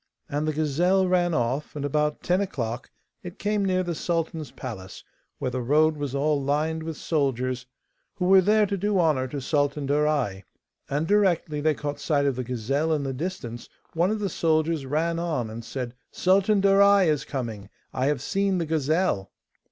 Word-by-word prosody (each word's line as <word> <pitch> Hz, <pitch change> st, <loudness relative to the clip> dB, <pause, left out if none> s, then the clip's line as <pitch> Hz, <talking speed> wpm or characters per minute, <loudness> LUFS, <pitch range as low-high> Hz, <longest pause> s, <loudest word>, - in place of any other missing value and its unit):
And 145 Hz, +2 st, -2 dB
the 155 Hz, -, 0 dB
gazelle 175 Hz, +6 st, +2 dB
ran 175 Hz, -2 st, +2 dB
off, 130 Hz, +5 st, -1 dB
and 145 Hz, -1 st, -3 dB
about 150 Hz, +1 st, 0 dB
ten 180 Hz, +2 st, +2 dB
o'clock 120 Hz, -, -4 dB, 0.3 s
it 180 Hz, -1 st, -9 dB
came 210 Hz, 0 st, 0 dB
near 185 Hz, -1 st, +1 dB
the 175 Hz, -1 st, -2 dB
sultan's 165 Hz, -2 st, -2 dB
palace, 95 Hz, -7 st, -8 dB, 0.3 s
where 125 Hz, -, -2 dB
the 130 Hz, 0 st, -2 dB
road 155 Hz, +5 st, +3 dB
was 145 Hz, -2 st, -4 dB
all 145 Hz, +1 st, +1 dB
lined 155 Hz, +4 st, 0 dB
with 160 Hz, -1 st, -5 dB
soldiers 130 Hz, -4 st, -1 dB, 0.5 s
who 180 Hz, -, -2 dB
were 190 Hz, +1 st, +7 dB
there 210 Hz, +3 st, +4 dB
to 200 Hz, 0 st, -2 dB
do 205 Hz, +1 st, 0 dB
honour 150 Hz, -6 st, +2 dB
to 140 Hz, +3 st, -5 dB
Sultan 145 Hz, +1 st, 0 dB
Darai. 145 Hz, -9 st, +1 dB, 0.5 s
And 145 Hz, +3 st, 0 dB
directly 175 Hz, -6 st, +2 dB
they 155 Hz, 0 st, +2 dB
caught 145 Hz, 0 st, -4 dB
sight 145 Hz, -3 st, +1 dB
of 140 Hz, -2 st, +1 dB
the 130 Hz, -, -3 dB
gazelle 130 Hz, +6 st, -1 dB
in 150 Hz, -2 st, 0 dB
the 135 Hz, -1 st, -2 dB
distance 125 Hz, -6 st, -5 dB, 0.2 s
one 170 Hz, +3 st, +2 dB
of 215 Hz, -, 0 dB
the 210 Hz, -1 st, -1 dB
soldiers 160 Hz, -4 st, 0 dB
ran 165 Hz, +4 st, 0 dB
on 150 Hz, -10 st, -2 dB
and 115 Hz, +1 st, -7 dB
said, 125 Hz, 0 st, -5 dB, 0.2 s
'Sultan 195 Hz, +2 st, +3 dB
Darai 200 Hz, 0 st, +6 dB
is 150 Hz, -2 st, +1 dB
coming: 115 Hz, -7 st, -5 dB, 0.2 s
I 130 Hz, +1 st, 0 dB
have 145 Hz, -3 st, 0 dB
seen 195 Hz, +1 st, 0 dB
the 170 Hz, -, -1 dB
gazelle. 155 Hz, -, 0 dB
150 Hz, 185 wpm, -25 LUFS, 135-175 Hz, 0.5 s, were